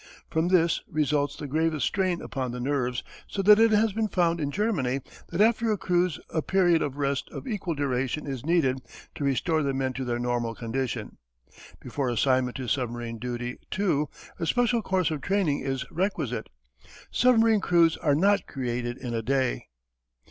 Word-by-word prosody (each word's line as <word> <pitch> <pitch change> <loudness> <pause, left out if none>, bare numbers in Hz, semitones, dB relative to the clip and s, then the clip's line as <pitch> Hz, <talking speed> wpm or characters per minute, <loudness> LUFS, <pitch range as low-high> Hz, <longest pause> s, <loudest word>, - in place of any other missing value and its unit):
From 160 +2 +1
this 170 -2 +3
results 145 -1 0
the 150 - -7
gravest 155 -1 0
strain 185 -3 0
upon 130 -2 -3
the 125 +1 -5
nerves 125 -2 -1 0.2
so 195 - -3
that 210 +2 +8
it 225 0 +6
has 215 -1 +3
been 220 +1 0
found 170 -4 +1
in 145 - -1
Germany 145 - 0 0.3
that 170 +4 0
after 225 +1 +3
a 210 - +1
cruise 175 -3 +1
a 160 - 0
period 175 -2 +3
of 140 -2 -2
rest 140 -1 -1
of - - -8
equal 195 -8 -2
duration 135 0 -1
is 135 -4 -5
needed 145 -5 +2 0.3
to - - -5
restore 155 +4 +1
the 140 -2 -1
men 130 -1 -1
to 130 - -4
their 120 -1 -1
normal 120 -1 -1
condition. 125 +3 -4 0.6
Before 140 -3 -3
assignment 130 +1 +1
to 130 -2 -5
submarine 120 -2 -2
duty, 120 0 -4
too, 170 -7 0 0.3
a 165 - -2
special 245 +1 +2
course 190 -4 0
of 150 -3 -3
training 180 -4 +1
is 135 -1 -3
requisite. 150 - -2 0.6
Submarine 225 -3 +4
crews 170 -3 +4
are 145 -4 +2
not 200 +6 +3
created 120 -2 -3
in 125 -3 -5
a 115 - -1
day. 130 +1 0
145 Hz, 175 wpm, -27 LUFS, 130-185 Hz, 0.6 s, that